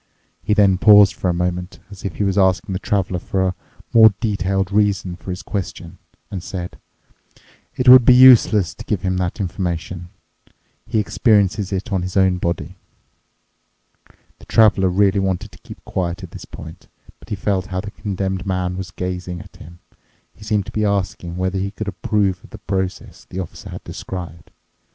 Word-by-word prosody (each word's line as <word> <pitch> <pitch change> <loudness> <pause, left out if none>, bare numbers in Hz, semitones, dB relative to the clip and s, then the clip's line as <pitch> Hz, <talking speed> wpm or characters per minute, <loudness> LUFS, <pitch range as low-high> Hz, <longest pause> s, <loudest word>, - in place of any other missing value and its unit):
He 105 +5 0
then 100 -3 +4
paused 105 -1 +7
for 90 - -2
a - - +3
moment, 90 +1 -3
as 100 - -11
if 95 - -4
he - - -1
was 100 -1 0
asking 95 -1 +2
the 95 - -2
Traveler 95 -3 -1
for 95 +1 -1
a 90 - -5 0.4
more 110 -3 +7
detailed 95 -3 -1
reason 100 -3 +1
for 90 - -11
his 90 0 -5
question, 90 -4 -6 0.3
and 95 - -4
said, 90 0 -7 1.0
"It 130 - -2
would 125 0 +10
be 125 +2 +6
useless 120 -7 +6
to - - -11
give 100 -4 -2
him 95 -1 0
that 90 +2 -2
information. 90 -2 -4 0.8
He - - -1
experiences 105 -2 +2
it 100 +3 -3
on 95 - +1
his 90 +2 -4
own 95 -1 +3
body." 85 +1 -3 1.6
The - - -15
Traveler 100 -4 +4
really 100 +2 +2
wanted 95 -2 -2
to - - -17
keep - - -13
quiet 90 +1 -3
at 90 - -9
this - - -10
point, 80 +4 -11 0.3
but - - -17
he - - -2
felt 95 -2 -1
how 95 -2 -3
the 105 +1 -8
Condemned 95 -3 -3
Man 90 -1 -2
was 95 -2 -5
gazing 90 0 -5
at - - -14
him—he 85 +4 -18
seemed 105 -2 0
to - - -8
be 110 - -1
asking 95 -4 -2
whether 95 +1 -1
he 100 +1 -2
could 110 +1 -7
approve 100 -2 -1
of - - -15
the - - -10
process 95 -1 -4
the - - -10
Officer 90 - -7
had - - -8
described. 85 -4 -8
95 Hz, 180 wpm, -20 LUFS, 90-100 Hz, 1.6 s, would